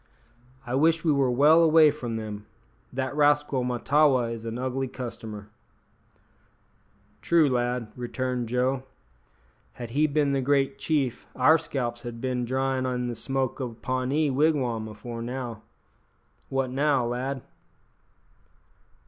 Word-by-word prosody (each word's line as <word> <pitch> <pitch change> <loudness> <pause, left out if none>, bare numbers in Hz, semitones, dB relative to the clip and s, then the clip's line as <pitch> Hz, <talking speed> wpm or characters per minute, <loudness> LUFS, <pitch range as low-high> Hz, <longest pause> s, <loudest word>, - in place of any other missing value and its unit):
"I 120 - -4
wish 160 +4 +3
we 160 - +3
were 140 -3 +2
well 150 +6 +5
away 160 -2 +6
from 120 -6 -5
them. 105 -2 -6 0.4
That 130 +2 -3
rascal 145 -3 +2
Mahtawa 125 0 +2
is 115 -1 -8
an 115 +1 -4
ugly 130 +1 -2
customer." 110 -5 -7 1.7
"True, 165 -3 +4
lad," 120 -3 -1
returned 125 -1 -3
Joe; 125 +2 +1 0.9
"had 120 -2 -8
he 150 +5 +3
bin 145 -1 +1
the 135 - +1
great 135 0 +1
chief 135 -6 -1
our 155 +6 +5
scalps 120 -6 -3
had 120 -1 -7
bin 125 -1 -2
dryin' 130 +1 0
in 125 -1 -2
the 120 - -4
smoke 135 +3 -2
o' 125 - -2
a - - -11
Pawnee 130 +5 0
wigwam 130 -6 +1
afore 115 +2 -7
now. 120 -1 -5 0.9
What 135 -1 -1
now, 140 -1 +2
lad?" 130 +2 -3
130 Hz, 130 wpm, -26 LUFS, 120-140 Hz, 1.7 s, away